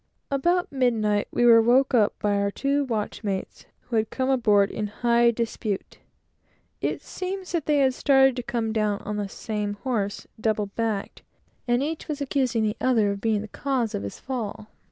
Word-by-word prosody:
About 345 +6 +1
midnight, 225 -6 +1
we 240 - +1
were 230 -1 +8
waked 255 +4 +3
up 215 -4 +3
by 205 -1 0
our 200 0 +1
two 280 +6 0
watchmates, 210 -3 -4
who 235 - -3
had 220 0 +1
come 260 0 -1
aboard 210 -6 +3
in 210 - -3
high 235 +2 +3
dispute. 225 -3 -3 0.8
It - - -2
seems 375 0 -5
they 305 -4 +1
had 265 -2 +3
started 270 -1 +4
to - - -1
come 230 -3 -2
down 210 -2 0
on 210 0 -4
the 205 -1 -3
same 210 0 -3
horse, 210 -6 -2
double 215 -1 0
backed; 210 0 -3 0.5
and 240 +2 +2
each 315 +2 -4
was 300 -2 -3
accusing 260 -5 0
the 210 -1 -1
other 225 -6 +3
of 200 0 -5
being 220 -2 +1
the 215 - -7
cause 250 0 -2
of - - -2
his 100 0 -7
fall. 220 -4 -5
230 Hz, 175 wpm, -25 LUFS, 210-265 Hz, 0.8 s, were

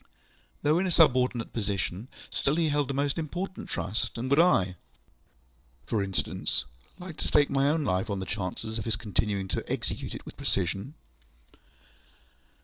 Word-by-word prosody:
Though 155 +3 +4
in 190 - +1
a - - 0
subordinate 130 -7 +3
position, 100 -1 -2 0.2
still 140 - +1
he 165 -1 +2
held 145 -2 +1
a - - 0
most 140 +3 0
important 180 +4 -4
trust, 110 +5 -2
and 130 +3 -3
would 140 - +5
I 95 - +4 1.1
(for 110 - 0
instance) 95 -6 0 0.3
like 180 -3 -8
to - - -2
stake 145 -1 +4
my 135 +1 +3
own 155 +1 +1
life 95 -3 0
on 100 - -1
the 95 - -3
chances 110 +3 -3
of 105 - -4
his 115 - +3
continuing 105 -3 -1
to - - -1
execute - - -2
it - - -9
with - - -10
precision? 95 - 0
120 Hz, 160 wpm, -29 LUFS, 100-150 Hz, 1.1 s, would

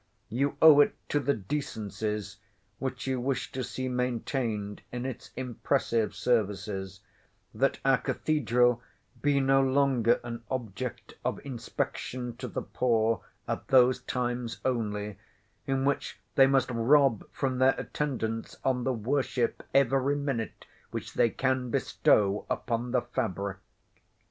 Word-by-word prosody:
You 140 +5 0
owe 155 -2 +10
it - - +2
to 145 - +2
the 140 0 +1
decencies, 105 -3 -3 0.4
which 130 -1 -3
you 130 -1 0
wish 135 +1 -1
to 130 - -3
see 125 +2 -4
maintained 120 -4 -2
in 125 +1 -4
its 130 -2 -6
impressive 125 -2 0
services, 100 -4 -1 0.5
that - - +1
our - - +5
Cathedral 125 -5 +2 0.4
be 145 -1 +3
no 135 0 +4
longer 135 -3 +3
an 120 -1 -5
object 125 -1 -4
of - - -1
inspection 125 -1 -4
to - - -5
the - - -4
poor 115 -3 +1 0.3
at - - -3
those 125 -1 +5
times 120 -1 -2
only, 105 -5 -1 0.5
in 135 0 +1
which 140 0 -1
they 135 -1 +7
must 135 -1 +2
rob 125 0 +4
from 130 -2 -1
their 130 +1 +4
Attendance 115 -6 -3
on 125 -2 +1
the 130 - +2
worship 125 +1 0
every 135 +1 +3
minute 140 -6 -3 0.2
which - - -6
they 115 - +4
can 130 +1 0
bestow 105 -3 +2
upon 120 0 -1
the 125 0 +1
fabric. 100 -5 -2
125 Hz, 130 wpm, -29 LUFS, 115-135 Hz, 0.5 s, owe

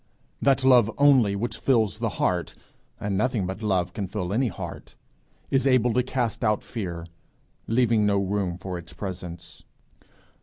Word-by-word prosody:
That 135 -1 +3
lore 125 -4 +5
only 130 -8 +5
which 115 +4 -3
fills 110 -5 +2
the 115 -1 0
heart 90 -3 0 0.4
and 100 -1 -2
nothing 115 -1 0
but 95 +3 -5
love 95 -4 0
can 100 -3 -3
fill 90 -1 -3
any 125 +4 +2
heart 110 - -7 0.6
is 135 0 +2
able 125 -3 +3
to 125 - +3
cast 125 -2 -2
out 105 -1 +1
fear, 85 -7 -5 0.6
leaving 115 -2 +3
no 100 -1 +2
room 100 -2 -1
for 95 -1 -5
its 85 0 -12
presence. 90 -2 -7
105 Hz, 155 wpm, -25 LUFS, 95-125 Hz, 0.6 s, lore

